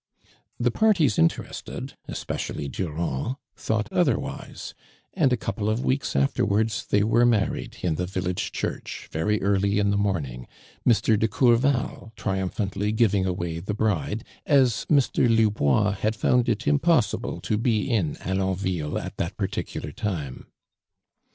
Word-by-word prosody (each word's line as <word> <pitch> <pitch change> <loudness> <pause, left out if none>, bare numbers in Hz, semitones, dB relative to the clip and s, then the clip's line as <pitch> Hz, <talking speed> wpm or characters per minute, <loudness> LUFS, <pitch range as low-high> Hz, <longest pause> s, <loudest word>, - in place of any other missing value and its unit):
"' - - -36
The 120 0 +2
parties 180 - +3
interested, 80 - -1
especially 70 - -4
Durand, 80 - -2 0.2
thought 110 -1 -1
otherwise, - - -1 0.4
and 135 - +3
a 125 - +3
couple 110 -1 -2
of 110 +3 -1
weeks 135 +2 0
afterwards 100 +10 +1
they 105 - +3
were 115 +2 +3
married 115 -4 +1
in 85 -4 0
tlio 90 0 -2
village 90 -1 -2
church, - - -5
very 105 +7 0
early 100 0 +2
in 100 0 +2
the 100 - +1
morning, 75 -12 -2 0.4
Mr. 110 -2 +3
de 110 - +3
Courval 120 -2 +1
triumphantly 95 +1 -2
giving 105 -4 +2
away 85 -2 -2
the 100 +4 -4
bride, 105 0 -1 0.2
as 130 -6 +3
Mr. 135 -4 +3
Lubois 105 -3 +3
had 110 +3 0
found 125 +3 +2
it 115 +2 -1
impossible 150 -4 +2
to 110 - -1
be 115 -2 +1
in 100 - 0
Alonville 95 -4 -1
at - - -7
that - - -3
particular - - -3
time. 75 -11 -4
105 Hz, 140 wpm, -25 LUFS, 95-115 Hz, 0.4 s, parties